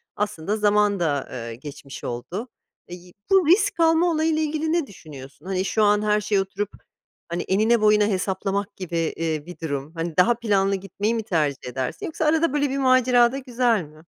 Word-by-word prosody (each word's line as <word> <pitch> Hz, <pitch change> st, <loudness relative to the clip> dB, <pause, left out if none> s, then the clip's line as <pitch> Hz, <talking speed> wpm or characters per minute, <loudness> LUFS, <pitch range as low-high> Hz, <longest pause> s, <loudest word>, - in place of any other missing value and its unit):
aslında 205 Hz, -1 st, -2 dB
zaman 210 Hz, -1 st, +2 dB
da, 145 Hz, -5 st, -1 dB
eee, 115 Hz, -2 st, -6 dB
geçmiş 140 Hz, +1 st, -10 dB
oldu. 175 Hz, -, -5 dB, 0.4 s
İii, 180 Hz, 0 st, -11 dB, 0.2 s
bu 380 Hz, -5 st, +4 dB
risk 395 Hz, +1 st, +3 dB
alma 330 Hz, +1 st, +4 dB
olayıyla 315 Hz, 0 st, +1 dB
ilgili 310 Hz, +1 st, -1 dB
ne 335 Hz, -6 st, 0 dB
düşünüyorsun? 145 Hz, -5 st, -12 dB
Hani, 190 Hz, 0 st, -1 dB
şu 215 Hz, +4 st, +1 dB
an 210 Hz, 0 st, +4 dB
her 210 Hz, 0 st, +1 dB
şeye 205 Hz, -1 st, +1 dB
oturup, 195 Hz, +1 st, -4 dB, 0.6 s
hani, 170 Hz, +1 st, -2 dB
enine, 220 Hz, +4 st, +2 dB
boyuna 210 Hz, -1 st, +4 dB
hesaplamak 195 Hz, +1 st, -2 dB
gibi, 175 Hz, -3 st, -5 dB
eee, 160 Hz, -2 st, -2 dB
bir 180 Hz, +1 st, -11 dB
durum, 145 Hz, -1 st, -4 dB
hani, 165 Hz, -1 st, -4 dB
daha 185 Hz, +6 st, +5 dB
planlı 200 Hz, -4 st, +1 dB
gitmeyi 200 Hz, +4 st, -2 dB
mi 225 Hz, -, -2 dB
tercih 150 Hz, -, -1 dB
edersin 130 Hz, 0 st, -4 dB
yoksa 320 Hz, 0 st, -3 dB
arada 315 Hz, -1 st, +2 dB
böyle 290 Hz, -1 st, +1 dB
bir 270 Hz, -, -2 dB
macera 255 Hz, -2 st, +4 dB
da 270 Hz, -, -4 dB
güzel 245 Hz, -5 st, +1 dB
mi? 155 Hz, 0 st, -15 dB
205 Hz, 180 wpm, -23 LUFS, 165-245 Hz, 0.6 s, daha